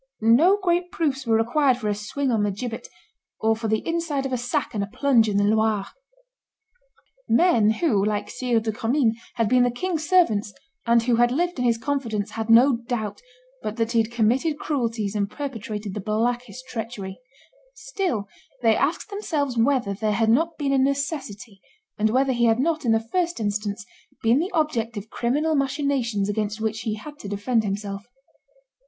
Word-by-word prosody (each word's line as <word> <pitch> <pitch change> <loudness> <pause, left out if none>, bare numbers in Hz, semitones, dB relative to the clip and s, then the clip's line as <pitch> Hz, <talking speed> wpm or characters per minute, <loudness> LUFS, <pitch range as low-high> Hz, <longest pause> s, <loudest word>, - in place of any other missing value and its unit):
No 300 - +5
great 355 -2 0
proofs 275 -6 -1
were 225 -1 +4
required 255 +3 +2
for 215 - -4
a 210 - +1
swing 250 +7 -2
on 225 -3 +1
the 205 - +1
gibbet, 225 +4 -5 0.5
or 220 0 +2
for 225 0 -4
the 220 0 -1
inside 330 -5 -1
of 265 - -3
a - - +1
sack 245 0 -2
and 205 -2 -1
a - - -4
plunge 245 -6 +3
in 200 - 0
the 205 - +3
Loire.... 215 -1 +2 1.4
Men 235 -6 +4
who, 220 - +1
like 210 0 -1
Sire 245 -3 0
de 220 0 -2
Commynes, 230 +2 +1 0.2
had 230 -2 +1
been 250 +3 +4
the 245 - +4
king's 315 +4 -3
servants, 220 - +3 0.3
and 235 0 +4
who 240 -1 +2
had 240 0 +4
lived 345 +3 -1
in 250 - 0
his 235 -1 +3
confidence, 230 -5 -2
had 225 0 -4
no 240 +3 +6
doubt 230 -4 -4 0.4
but 215 - -4
that 225 0 -1
he 230 - +3
had 220 +1 -4
committed 245 +7 +1
cruelties 230 -9 -2
and 200 -2 -1
perpetrated 215 -7 -5
the 210 - -4
blackest 240 +4 -2
treachery; 220 -5 -6 0.6
still 370 - -3 0.4
they 225 -1 +5
asked 335 +7 -1
themselves 305 - -2
whether 235 -3 +2
there 210 +1 -1
had 220 +1 +2
not 325 +8 +2
been 280 -2 0
a 270 - +3
necessity, 265 - -2 0.4
and 215 +1 +3
whether 260 +3 +2
he 240 -1 +2
had 225 +1 +3
not, 315 +1 0
in 230 - +3
the 225 - +4
first 345 +9 -2
instance, 205 0 -2 0.4
been 230 +4 +4
the 350 +4 -1
object 240 - -1
of 205 +2 -7
criminal 295 +7 0
machinations 270 -7 0
against 210 +1 -2
which 220 0 -2
he 220 -2 -2
had 290 +7 -10
to 200 - -7
defend 220 +3 0
himself. 200 0 -4
235 Hz, 185 wpm, -24 LUFS, 215-280 Hz, 1.4 s, no